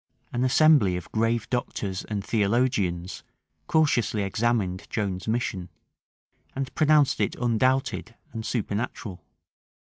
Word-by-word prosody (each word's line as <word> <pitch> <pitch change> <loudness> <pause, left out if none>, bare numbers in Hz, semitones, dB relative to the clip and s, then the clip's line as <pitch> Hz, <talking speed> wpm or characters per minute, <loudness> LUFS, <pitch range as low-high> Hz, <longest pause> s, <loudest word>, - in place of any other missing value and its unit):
An 120 - 0
assembly 130 - +4
of 90 - -9
grave 115 0 0
doctors 100 -6 -2
and 100 -2 -4
theologians 100 -5 0 0.5
cautiously 120 -9 +2
examined 100 -2 -1
Joan's 95 -3 -3
mission, 110 -6 -2 0.9
and 135 -1 -4
pronounced 150 -5 +3
it 100 - 0
undoubted 120 0 0 0.2
and 115 -1 -5
supernatural. 110 - -3
115 Hz, 100 wpm, -26 LUFS, 100-125 Hz, 0.9 s, assembly